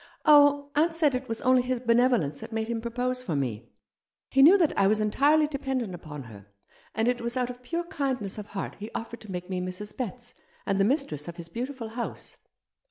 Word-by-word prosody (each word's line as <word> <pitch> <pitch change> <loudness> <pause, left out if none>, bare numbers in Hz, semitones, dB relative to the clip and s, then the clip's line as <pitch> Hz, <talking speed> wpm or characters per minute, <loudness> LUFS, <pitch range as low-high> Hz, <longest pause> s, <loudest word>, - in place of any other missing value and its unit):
"Oh, 285 -1 +6
aunt 325 +3 +2
said 305 -4 +3
it 255 +1 -3
was 225 0 -2
only 255 0 +4
his 250 0 -2
benevolence 235 - +2
that - - -9
made 220 0 -2
him 230 -1 -2
propose 250 +2 -2
for 200 -11 -3
me. 120 -5 -3 0.6
He 270 - +4
knew 340 +8 +9
that 335 -6 +2
I 195 - +4
was 215 +2 +3
entirely 285 +9 +3
dependent 265 -8 -3
upon 150 -5 -8
her, 105 -4 -13 0.5
and 225 +1 +1
it 245 -1 +1
was 235 +2 -2
out 250 -1 0
of 245 0 -13
pure 335 +7 -3
kindness 265 - -3
of 205 - -7
heart 200 -2 -5
he 210 +2 -6
offered 230 +1 -6
to 215 - -9
make 180 -1 -5
me 185 -1 -3
Mrs. 185 +3 -5
Betts, 245 0 -6 0.3
and 195 -1 0
the 195 - +4
mistress 210 - -1
of 170 - -6
his 170 -1 -9
beautiful 245 +3 -5
house." 235 +1 -6
235 Hz, 215 wpm, -27 LUFS, 195-270 Hz, 0.6 s, knew